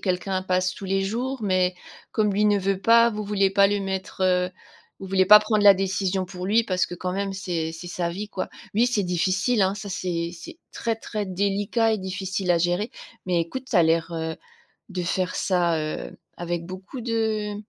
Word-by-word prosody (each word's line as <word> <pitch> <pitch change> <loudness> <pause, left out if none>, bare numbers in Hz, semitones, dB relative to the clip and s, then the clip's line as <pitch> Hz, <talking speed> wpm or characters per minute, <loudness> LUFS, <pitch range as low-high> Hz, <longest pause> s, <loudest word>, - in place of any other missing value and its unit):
quelqu'un 185 0 -1
passe 185 0 0
tous 200 - -9
les 195 0 0
jours. 245 +7 -2
Mais, 185 -2 +2 0.4
comme 210 -2 +1
lui 210 +1 +2
ne 205 -1 +4
veut 195 0 -1
pas, 230 +1 +6
vous 215 -1 -4
vouliez 200 -2 +1
pas 195 0 +5
le 205 0 0
mettre, 190 0 -4
heu, 180 -1 +2 0.5
vous 195 - -8
vouliez 190 0 +2
pas 210 +1 +10
prendre 215 0 0
la 200 -1 +9
décision 190 0 -1
pour 180 0 -8
lui 220 +4 +3
parce 185 -4 0
que 175 - -7
quand 180 +1 -3
même 195 0 -2
c’est 175 -4 -3
c'est 165 +2 -9
sa 175 -1 -2
vie, 200 +4 -5
quoi. 190 - -4 0.3
Oui 235 +4 +4
c'est 210 -5 0
difficile 190 +6 +1
hein, 190 +1 +2
ça 205 0 -7
c'est 175 -3 -2
c’est 175 - -11
très 230 -1 -2
très 215 -1 -4
délicat 200 +4 0
et 215 - 0
difficile 190 0 -3
à 170 - +4
gérer. 175 +6 0 0.4
Mais 175 -2 +2
écoute, 260 +11 -5
tu 215 - +2
as 170 - +6
l’air, 165 +1 +2
heu, 160 -1 -3 0.5
de 185 -3 -4
faire 180 +1 -1
ça, 175 -3 +1
heu, 155 0 -5 0.2
avec 175 -1 -3
beaucoup 185 +8 -8
de 220 -3 -1
190 Hz, 205 wpm, -24 LUFS, 180-210 Hz, 0.5 s, pas